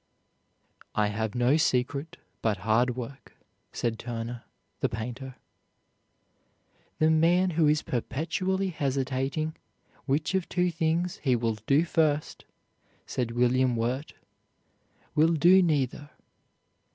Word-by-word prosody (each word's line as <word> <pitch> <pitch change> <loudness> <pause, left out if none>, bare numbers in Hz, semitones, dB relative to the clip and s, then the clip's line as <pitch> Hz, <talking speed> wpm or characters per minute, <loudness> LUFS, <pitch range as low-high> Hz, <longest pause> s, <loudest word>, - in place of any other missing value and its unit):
"I 105 -1 +2
have 110 +1 -3
no 125 +5 +3
secret 140 +1 0 0.2
but 110 -2 +1
hard 120 +3 +2
work," 130 0 -8 0.4
said 115 -2 -2
Turner, 120 0 -5 0.3
the - - +1
painter. 125 +4 -6 1.6
"The 155 +1 +3
man 175 +4 +3
who 160 -1 +3
is 150 0 +2
perpetually 185 +9 -1
hesitating 140 +1 -2 0.5
which 145 +6 0
of 190 -2 -1
two 180 0 +1
things 165 +2 0
he 130 -4 +1
will 115 -2 -1
do 145 +4 +4
first," 155 -3 0 0.6
said 125 -2 -2
William 125 +1 +2
Wirt, 125 +6 -2 1.0
"will 160 +2 +4
do 175 +5 +6
neither. 145 -3 0
140 Hz, 110 wpm, -28 LUFS, 120-160 Hz, 1.6 s, do